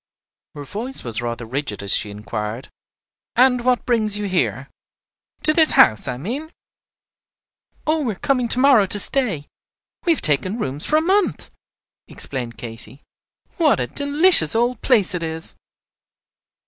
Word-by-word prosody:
Her 145 - -7
voice 230 - -1
was 115 -1 -1
rather 120 0 -5
rigid 120 -4 -4
as 100 - +5
she 105 - +1
inquired, 105 +3 -6 0.6
"And 250 -1 +3
what 250 0 +1
brings 215 -4 +2
you 210 - -4
here? 185 -2 -1 0.8
to 310 - +2
this 315 -1 +4
house, 110 -2 +4
I 125 - -3
mean?" 260 - -5 1.3
"Oh, 310 +1 +1
we 240 -7 -2
are - - -14
coming 250 0 0
to 235 - +1
morrow 255 -7 +5
to 205 - 0
stay; 205 - -1 0.6
we 340 - +4
have - - -5
taken 175 +8 +1
rooms 140 - -4
for 305 - +1
a 310 - +4
month," 385 +4 0 0.6
explained 125 -4 -3
Katy. 120 +4 -9 0.5
"What 320 -5 +3
a - - 0
delicious 285 - +2
looking 230 - +3
old 250 - -11
place 220 -9 +2
it 180 - -3
is." 160 0 -5
205 Hz, 155 wpm, -20 LUFS, -, 1.3 s, as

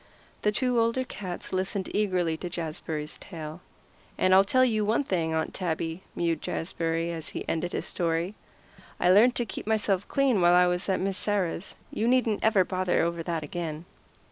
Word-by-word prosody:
The 210 - +2
two 250 +2 +1
older 230 +3 +2
cats 190 -9 -6
listened 190 +1 -2
eagerly 185 -6 +1
to 175 - -5
Jazbury's 160 -2 -4
tale. 160 -1 -8 0.6
"And 185 - +3
I'll 190 +1 +8
tell 255 +6 +4
you 215 -4 +1
one 220 +6 +2
thing, 170 -10 -1
Aunt 160 - -1
Tabby," 165 -1 -2
mewed 165 -2 0
Jazbury 165 0 -2
as 160 -2 -6
he - - -6
ended 175 +2 -1
his - - -2
story, 170 +2 -1 0.7
"I 180 - +4
learned 230 +6 +6
to 240 - 0
keep - - -7
myself 205 -3 +1
clean 270 -8 +2
while 175 0 +6
I 180 0 +6
was 180 +2 -1
at 190 - +2
Miss 195 0 -1
Sarah's. 195 -3 -1 0.2
You 225 - -1
needn't 240 -4 +2
ever 215 -4 +4
bother 185 -2 +1
over 170 0 -1
that 165 -2 -2
again." 160 +1 -5
180 Hz, 180 wpm, -27 LUFS, 165-210 Hz, 0.7 s, I'll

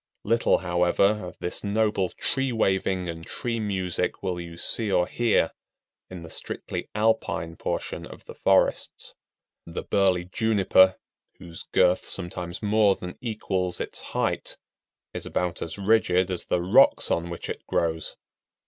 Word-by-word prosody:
Little, 115 0 +3
however, 90 +4 +2
of 90 -2 -8
this 90 - -2
noble 105 -2 +1
tree 135 -1 -1
waving 95 -4 0
and 80 -1 -6
tree 115 +6 -3
music 95 -5 -2
will 90 -2 -2
you 85 -1 -9
see 105 +4 +1
or 90 -2 +3
hear 115 -6 +1 0.6
in 90 -2 -8
the 85 - -9
strictly - - -5
alpine 95 -7 0
portion - - -4
of - - -13
the - - -9
forests. - - +1 0.5
The 85 - -5
burly 95 -3 +2
Juniper, 95 -2 +4 0.4
whose 85 -1 -10
girth 90 +1 +3
sometimes 90 0 -4
more 105 -1 +4
than 90 0 -8
equals 95 -6 -2
its - - -5
height, - - -2 0.6
is - - -5
about 90 -1 -2
as 80 - -4
rigid 95 -3 +2
as 90 - -2
the 85 - 0
rocks 90 - +5
on 85 +1 0
which 85 - -6
it - - -5
grows. 80 -1 -1
95 Hz, 145 wpm, -26 LUFS, 85-105 Hz, 0.6 s, rocks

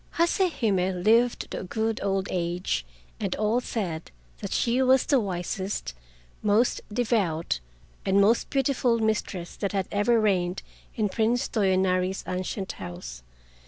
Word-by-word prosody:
Hase 345 +2 +2
Hime 185 -4 +1
lived 230 +3 +3
to - - -3
a - - -5
good 220 +3 -1
old 195 0 0
age, 175 - -1 0.3
and - - -1
all 215 +4 +1
said 175 -10 -4 0.3
that - - -5
she 245 +2 +2
was 260 0 +4
the 275 - +4
wisest, 190 - -3 0.5
most 215 +4 +2
devout, 205 - 0 0.4
and 195 +1 +3
most 215 +4 +3
beautiful 265 -3 +2
mistress 215 -5 -2
that 200 -1 -2
had 195 -2 0
ever 225 +3 +3
reigned 185 -4 +1 0.3
in 215 -2 +1
Prince 235 +5 +1
Toyonari's 190 -2 +1
ancient 185 +1 -3
house. - - -8
200 Hz, 135 wpm, -26 LUFS, 185-230 Hz, 0.5 s, was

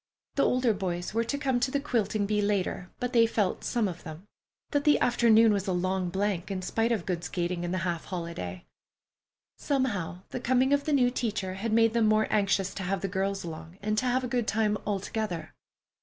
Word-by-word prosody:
The 280 - +1
older 250 -2 +3
boys 180 -2 -3
were 230 +1 +2
to 280 +5 -2
come 265 -3 0
to 250 - +1
the 280 - 0
quilting 220 -7 0
bee 210 0 +1
later, 200 -3 -1
but 250 +1 -2
they 230 -1 +6
felt—some 220 +1 0
of 175 -2 -6
them—that 190 - -6
the 295 -1 +4
afternoon 230 -2 +5
was 200 -1 -1
a 185 - +1
long 185 0 0
blank 195 0 -1
in 190 -2 -3
spite 225 +5 0
of 215 -7 0
good 175 -3 -2
skating 175 0 -2
and 175 - -2
the 185 - 0
half 170 -2 -2
holiday. 165 - -5 0.9
Somehow, 205 - -1
the - - -4
coming 255 +2 +2
of 285 0 +1
the 305 - 0
new 250 -3 +4
teacher 210 -7 -2
had 210 +4 -3
made 225 0 +4
them 230 -2 +3
more 215 0 +4
anxious 195 -2 +1
to - - -5
have 190 0 -1
the 195 - -1
girls 195 +1 -2
along 165 +1 -8
and 215 +1 -1
to 255 - -1
have 255 +1 +1
a - - -1
good 240 -2 -1
time 215 -1 +1
all 200 -1 0
together. 200 -4 -4
205 Hz, 210 wpm, -28 LUFS, 185-235 Hz, 0.9 s, they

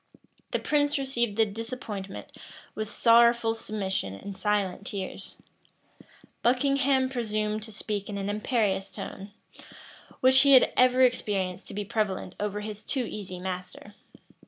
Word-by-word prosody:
The - - 0
prince 290 -1 +1
received 240 -6 -1
the 225 - +5
disappointment 210 -2 -7 0.4
with 215 -1 -4
sorrowful 235 -1 +5
submission 190 - -3
and 200 - -8
silent 200 -2 -1
tears: 195 -1 -6 1.0
Buckingham 265 +1 +2
presumed 215 -4 -2
to 220 +1 -8
speak 210 -1 -4
in 205 - -4
an 195 0 -3
imperious 205 -2 0
tone, 195 +2 -7 0.9
which 260 +1 +6
he 280 0 +6
had 260 - +6
ever 255 +1 +5
experienced 200 -7 0
to - - -8
be 205 0 -3
prevalent 195 -3 -2
over 210 0 -2
his 210 0 -7
too 260 -3 -1
easy 185 -5 -6
master. 185 +2 -6
215 Hz, 135 wpm, -27 LUFS, 200-245 Hz, 1.0 s, which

